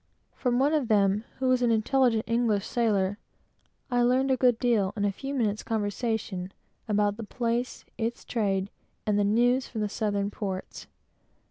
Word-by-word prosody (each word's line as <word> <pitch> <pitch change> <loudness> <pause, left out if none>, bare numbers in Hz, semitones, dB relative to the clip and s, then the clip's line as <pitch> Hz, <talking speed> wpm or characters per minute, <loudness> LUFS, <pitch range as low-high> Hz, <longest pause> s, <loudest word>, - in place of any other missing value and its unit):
From 245 -2 0
one 280 +4 +3
of 295 -6 +1
them, 205 0 +2
who 260 - -1
was 255 -1 +3
an 240 - +3
intelligent 230 0 +2
English 230 -3 +1
sailor, 205 -4 0 0.7
I 245 0 +3
learned 255 +2 +3
a - - +4
good 250 -3 +3
deal, 225 -6 +1
in 205 - +1
a 200 - +2
few 270 +7 -6
minutes' 215 -6 0
conversation, 210 -3 -2 0.4
about 205 -1 +1
the 230 - -5
place, 235 +2 -2
its 230 +1 -3
trade, 200 -4 -1 0.3
and 210 -1 +2
the - - +3
news 245 +5 +2
from 220 - -5
the 210 - -1
southern 205 -1 -1
ports. 190 -3 -5
225 Hz, 165 wpm, -27 LUFS, 205-245 Hz, 0.7 s, a